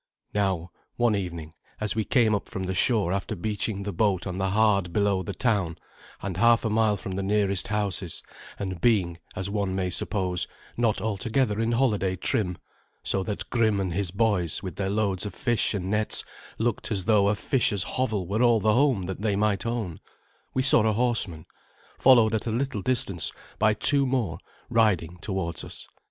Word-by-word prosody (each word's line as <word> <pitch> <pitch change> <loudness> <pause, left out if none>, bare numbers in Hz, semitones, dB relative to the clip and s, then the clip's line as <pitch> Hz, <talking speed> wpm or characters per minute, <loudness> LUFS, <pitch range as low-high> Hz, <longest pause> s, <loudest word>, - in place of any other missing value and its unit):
Now, 95 -4 0 0.2
one 120 -3 +2
evening, 85 -5 -5 0.3
as 105 -1 -1
we 110 -1 -1
came 115 -4 +3
up 100 - -2
from 95 - -4
the 95 0 -2
shore 100 -2 +2
after 100 -1 -2
beaching 100 +1 -2
the 100 0 -4
boat 95 0 +1
on 90 -1 -4
the 95 0 0
hard 100 -3 +2
below 100 -1 +1
the 90 - -5
town, 100 -9 0 0.5
and 95 -3 -3
half 115 +3 +4
a 110 - 0
mile 110 -1 +2
from 95 - -6
the 95 +1 -2
nearest 100 -1 0
houses, 100 -5 -2 0.3
and 95 -4 -4
being, 95 -8 +2 0.2
as 95 +1 -2
one 100 -2 -1
may 90 -1 -1
suppose, 90 0 -1 0.3
not 115 -3 +1
altogether 110 +1 0
in 115 +1 +1
holiday 105 -7 +1
trim, 90 -2 0 0.5
so 95 - +1
that 100 +1 -4
Grim 110 -4 +2
and 95 -3 -1
his 95 0 0
boys 100 -4 0
with 95 - -5
their 95 -1 -2
loads 100 -2 0
of 105 -3 -5
fish 120 -3 +1
and 95 -1 -3
nets 105 0 0 0.3
looked 115 0 -1
as 95 -4 -1
though 105 -2 +4
a 105 - +2
fisher's 105 -4 +1
hovel 110 -6 -1
were 100 +6 -1
all 120 -2 +5
the 110 +1 +3
home 125 -7 +2
that 95 +2 -5
they 105 -2 +1
might 105 +1 0
own, 110 -8 -3 0.6
we 130 - +2
saw 130 -3 +5
a 110 -1 +2
horseman, 110 -9 0 0.5
followed 120 -4 +6
at 110 +1 -1
a - - 0
little 120 -2 -1
distance 100 -8 +1 0.3
by 110 0 +4
two 140 +5 +3
more, 115 -11 -1 0.3
riding 95 -7 +1
towards 90 -4 -3
us. - - -9
100 Hz, 185 wpm, -26 LUFS, 95-110 Hz, 0.6 s, followed